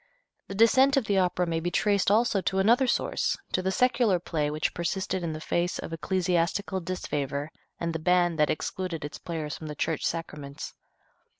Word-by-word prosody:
The 195 - -6
descent 260 +6 +5
of 265 - +2
the 200 -2 +2
Opera 180 -1 +1
may 165 -1 -1
be 175 +2 -1
traced 200 +2 +2
also 215 -1 +3
to 190 - -1
another 235 +7 +4
source, - - 0
to 185 - +1
the 190 +1 0
secular 235 -3 +3
play 155 -3 -2
which 155 +1 -1
persisted 185 +2 -2
in 165 -2 -2
the 155 - -5
face 175 +2 -1
of 165 - -6
ecclesiastical 185 +3 0
disfavor 150 -4 -3 0.3
and 170 -1 -2
the 160 - -2
ban 175 0 +2
that 150 -1 +3
excluded 165 -1 -3
its 145 - -7
players 155 -3 -4
from 155 - -8
the 150 - -6
church 160 +2 -1
sacraments. 150 -4 -4
175 Hz, 185 wpm, -27 LUFS, 160-195 Hz, 0.3 s, descent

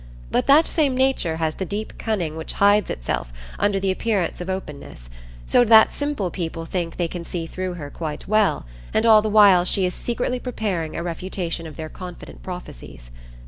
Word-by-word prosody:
But - - +1
that 300 +4 +7
same 285 -5 +1
Nature 260 -11 +1
has 160 -1 -1
the 190 - -4
deep 205 +4 -5
cunning 180 -9 -2
which 160 0 -6
hides 205 +1 +3
itself - - -3 0.3
under 205 -1 +2
the 190 0 0
appearance 190 -4 -1
of 180 - -5
openness, 145 - -7 0.3
so 245 - +4
that 220 -1 +6
simple 285 -11 -2
people 165 -2 -4
think 170 -1 -3
they 175 - 0
can 170 0 -6
see 170 -1 -4
through 185 +2 -4
her 145 -4 -7
quite 155 -3 -6
well, 215 - +2 0.3
and 220 - +3
all 220 -2 +7
the 215 - -2
while 200 -4 +6
she 185 +1 +1
is 180 - -1
secretly 245 +1 -2
preparing 205 -10 -3
a 170 - -3
refutation 170 -1 -4
of 155 - -10
their 160 +1 -6
confident 180 +2 -10
prophecies. - - -9
185 Hz, 185 wpm, -22 LUFS, 165-215 Hz, 0.3 s, that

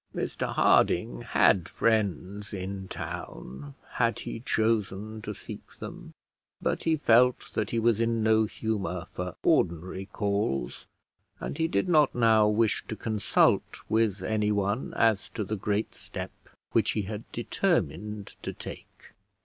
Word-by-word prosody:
Mr - - -2
Harding - - +3
had 90 +6 +3
friends 105 -2 0
in 95 0 -5
town 70 -3 -7 0.2
had - - +1
he - - -5
chosen 110 -2 0
to 105 - -5
seek 105 - -10
them; - - -9 0.4
but - - -1
he 160 -1 +2
felt 125 -2 +4
that 105 -2 -1
he 115 - -1
was 115 -1 +3
in 115 -1 +1
no 110 0 +4
humour 100 -6 -3
for 90 -1 -5
ordinary 90 +3 +1
calls, 100 - -2 0.5
and - - -5
he 160 - +3
did 175 - 0
not 155 -5 +4
now 110 -3 +5
wish 110 +1 +2
to 110 - -4
consult 110 -1 +2
with 110 -3 +1
anyone 105 +1 0
as 110 -3 +2
to 105 - -3
the 105 +2 -3
great 105 +1 -1
step - - -7 0.4
which - - +2
he 105 - -1
had 105 +3 -7
determined 105 - -1
to - - -4
take. - - -11
105 Hz, 140 wpm, -28 LUFS, 95-115 Hz, 0.5 s, now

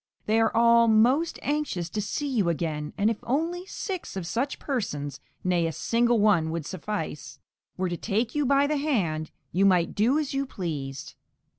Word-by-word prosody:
They 220 +1 +2
are 225 - +3
all 235 0 +6
most 245 +9 +3
anxious 290 - -1
to 215 - -2
see 285 +8 -3
you 220 -10 +1
again, 155 -3 -2
and 210 +3 +3
if 225 - -3
only 335 +8 -1
six 375 - -5
of 185 - -4
such 245 +10 -2
persons 145 - -3 0.2
(nay, 175 -2 +2
a - - -2
single 235 +8 +2
one 200 -7 +3
would 165 -2 -3
suffice) 160 -7 -5 0.4
were 185 0 0
to 175 - -3
take 225 +5 -1
you 295 - +1
by 280 +1 +4
the 300 +1 0
hand, 180 - 0 0.2
you 185 +4 +2
might 180 -3 +3
do 235 +8 +3
as 300 -3 -2
you 275 0 -1
pleased. 145 - -5
215 Hz, 180 wpm, -26 LUFS, 170-270 Hz, 0.4 s, all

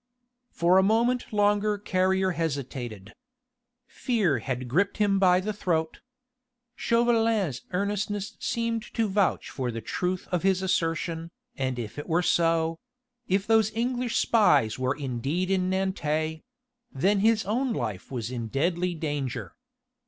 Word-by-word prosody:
For 175 +2 +3
a - - +6
moment 235 +5 +1
longer 205 0 +2
Carrier 190 -1 +1
hesitated. 130 - -4 0.7
Fear 210 - 0
had 130 +1 -4
gripped 185 +11 +1
him 200 -2 +2
by 180 -1 +5
the 210 +3 -3
throat. 160 -5 -1 0.8
Chauvelin's 225 - +1
earnestness 205 +1 -2
seemed 230 -1 -1
to 225 -2 +2
vouch 200 -1 0
for 130 -2 -3
the 115 -1 -4
truth 180 +10 -3
of 180 -2 +1
his 190 0 +2
assertion, 165 -2 -1 0.3
and 130 -1 -2
if 115 0 -6
this 145 - -5
were 175 +2 +1
so 165 -1 +2 0.5
if 195 +1 +1
those 220 -1 +3
English 245 0 -1
spies 180 - +3
were 130 +1 0
indeed 140 +7 -2
in 185 -1 +1
Nantes 160 -5 -1 0.5
then 195 +9 +2
his 220 +1 +3
own 245 +6 0
life 105 - -4
was 120 -2 -4
in 120 -3 -4
deadly 170 +7 0
danger. 135 - -3
180 Hz, 135 wpm, -27 LUFS, 145-205 Hz, 0.8 s, a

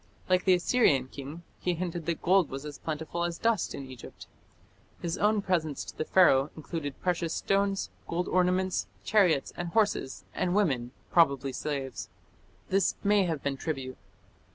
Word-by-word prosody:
Like 185 0 +2
the 185 -1 +6
Assyrian 175 - +3
king, 145 +5 -8 0.2
he 180 -1 0
hinted 170 -1 -4
that 170 -2 -2
gold 185 -1 +4
was 135 +2 -6
as 145 -2 -7
plentiful 160 +2 -3
as 170 -1 -2
dust 230 -3 0
in 140 - -6
Egypt. 130 -2 -11 0.7
His 170 0 -2
own 210 0 +2
presents 160 -7 0
to - - -9
the 155 - -2
Pharaoh 150 -7 +5
included 155 -3 -5
precious 170 -2 0
stones, 195 0 0 0.2
gold 175 +2 -1
ornaments, 185 +1 +1 0.2
chariots 180 -10 +3
and 175 - -4
horses, 205 -9 0
and 180 0 0
women 135 -13 +1 0.2
(probably 140 -5 +3
slaves). 135 -3 -4 0.6
This 195 -1 +2
may 205 -1 +4
have 160 -5 -2
been 140 -1 -1
tribute. 135 -4 -4
170 Hz, 155 wpm, -29 LUFS, 140-185 Hz, 0.7 s, the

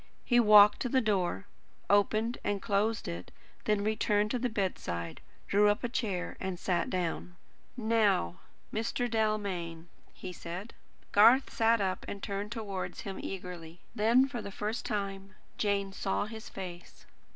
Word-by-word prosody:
He 240 -1 +4
walked 210 -2 +8
to 250 - -1
the 260 - +3
door, 200 -4 0 0.4
opened 215 +4 +2
and 205 -1 0
closed 210 +2 0
it; 85 +1 -6 0.4
then 210 -1 +1
returned 210 -1 +1
to 250 - 0
the 250 +1 0
bedside, 85 - -3 0.3
drew 205 +1 +4
up 205 - 0
a 240 - -1
chair, 200 -7 -2
and 190 -1 -3
sat 180 0 0
down. 175 -1 -3 0.4
"Now, 215 - +2 0.3
Mr. 230 +2 -1
Dalmain," 200 -7 -2 0.2
he 185 - -8
said. 180 +6 -7 0.4
Garth 235 +6 +6
sat 230 0 +3
up 190 -1 -1
and 200 - -6
turned 200 0 -3
towards 205 -5 -4
him 195 -1 -6
eagerly. 180 -3 -7
Then, 235 +5 +4
for 245 -3 -5
the 200 - -6
first 210 +4 -3
time, 195 -2 -4 0.2
Jane 200 -2 0
saw 195 +1 -1
his 220 +1 -8
face. 180 -2 -9
205 Hz, 150 wpm, -31 LUFS, 185-220 Hz, 0.4 s, walked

